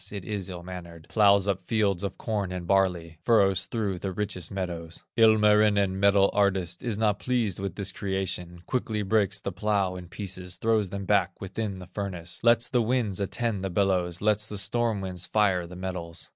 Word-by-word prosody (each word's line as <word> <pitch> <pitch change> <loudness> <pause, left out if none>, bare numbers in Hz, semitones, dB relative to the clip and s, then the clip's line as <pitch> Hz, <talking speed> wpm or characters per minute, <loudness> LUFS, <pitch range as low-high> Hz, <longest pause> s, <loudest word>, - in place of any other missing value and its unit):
it 100 -3 -6
is 100 -3 -4
ill 90 -1 -7
mannered, 85 -3 -9
Plows 100 -2 +4
up 95 -2 -1
fields 100 -5 +1
of 100 -2 -4
corn 105 -5 -2
and 90 -1 -5
barley, 85 -4 +1
Furrows 95 -5 +3
through 100 -4 -2
the 95 +2 -3
richest 95 -3 -3
meadows. 85 -4 -5
Ilmarinen, 105 -3 +4
metal 100 0 +4
artist, 95 -4 +1
Is 115 -4 -2
not 105 -2 +1
pleased 115 -7 -1
with 95 -2 -4
this 100 -1 -2
creation, 90 -3 -4
Quickly 110 -4 -1
breaks 100 0 +1
the 100 - -4
plow 100 -1 0
in 90 -1 -8
pieces, 90 -1 -4
Throws 110 -3 +1
them 100 +1 -5
back 95 -2 +1
within 100 +1 -4
the 90 - -9
furnace, 90 -2 -4
Lets 115 0 +4
the 125 - +2
winds 115 -4 0
attend 100 0 -2
the 95 - -1
bellows, 90 -2 0
Lets 105 0 +2
the 105 - -4
storm 110 +1 +1
winds 90 -2 -3
fire 95 -5 +2
the 90 - -10
metals. 90 -3 -5
100 Hz, 185 wpm, -27 LUFS, 90-105 Hz, -, Plows